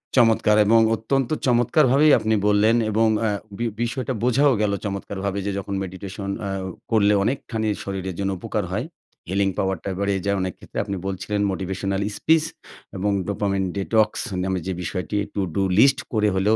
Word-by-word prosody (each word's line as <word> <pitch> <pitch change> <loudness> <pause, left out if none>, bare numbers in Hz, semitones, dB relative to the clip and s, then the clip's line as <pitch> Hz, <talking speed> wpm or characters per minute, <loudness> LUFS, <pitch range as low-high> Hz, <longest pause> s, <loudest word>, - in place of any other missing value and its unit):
চমৎকার 115 -3 +4
এবং 115 +2 +5 0.2
অত্যন্ত 130 +3 -1 0.2
চমৎকারভাবেই 135 +4 +4
আপনি 110 0 +1
বললেন, 105 +2 +4 0.2
এবং 110 +2 +3 0.2
আ - - +1 0.3
বি 120 - -2 0.2
বিষয়টা 125 +2 -2
বোঝাও 135 +3 +4
গেলো 100 -1 +1
চমৎকারভাবে 100 0 -3
যে 100 - -1
যখন 100 +1 -6
মেডিটেশন 95 +1 -6 0.2
আ - - -3 0.4
করলে 105 -2 +4
অনেকখানি 110 -2 -2 0.2
শরীরের 95 -2 -4
জন্য 100 0 0
উপকার - - -2
হয়। - - -2 0.4
healing 95 0 +1
power 95 -1 0
টা - - -3
বাড়িয়ে 100 -2 0
যায় 100 0 +1
অনেক 95 -1 -2
ক্ষেত্রে। - - -11
আপনি 100 -1 -4
বলছিলেন 100 +2 -2
মোটিভেশনাল 95 +1 -2 0.2
স্পিস 160 0 +3 0.5
এবং 100 +2 0 0.2
ডোপামিন 100 -1 -1
ডিটক্স 110 +2 +1 0.2
নামে 95 -1 -1
যে 95 - -1
বিষয়টি 90 +4 -3 0.2
টুডু 95 -1 -1 0.2
লিস্ট 135 +3 +5
করে 105 -2 +2
হলেও, 105 +4 +3
100 Hz, 160 wpm, -23 LUFS, 95-115 Hz, 0.5 s, এবং